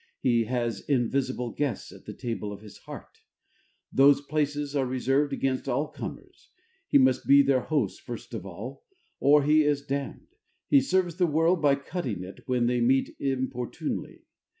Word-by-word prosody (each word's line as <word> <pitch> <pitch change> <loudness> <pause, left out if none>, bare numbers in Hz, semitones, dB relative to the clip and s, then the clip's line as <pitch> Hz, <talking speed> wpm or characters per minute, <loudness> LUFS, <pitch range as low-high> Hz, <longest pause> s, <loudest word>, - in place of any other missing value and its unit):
He 120 -3 +2
has 120 -3 -2
invisible 130 -2 0
guests 145 -4 -3
at - - -15
the - - -7
table 115 -3 -4
of 100 0 -9
his 105 -2 -13
heart: - - -11 0.7
those 140 +1 +6
places 145 0 -2
are 140 - +2
reserved 135 +3 +1
against 135 0 -1
all 140 +4 0
comers. - - -9 0.4
He - - +5
must 130 -1 +3
be 140 0 +7
their 135 -1 +3
host 135 -8 -1
first 120 0 -8
of 110 -6 -5
all, 105 +9 -8 0.4
or 145 +1 +5
he 155 +2 +4
is 145 -1 0
damned. 140 - -5 0.4
He 280 -2 +6
serves 185 - 0
the 180 -2 +3
world 165 +3 +2
by 145 -2 +4
cutting 140 - -4
it 95 +1 -10
when 125 -2 +1
they 120 0 +1
meet 130 +3 +2
inopportunely. 130 +2 -3
135 Hz, 165 wpm, -27 LUFS, 120-145 Hz, 0.7 s, be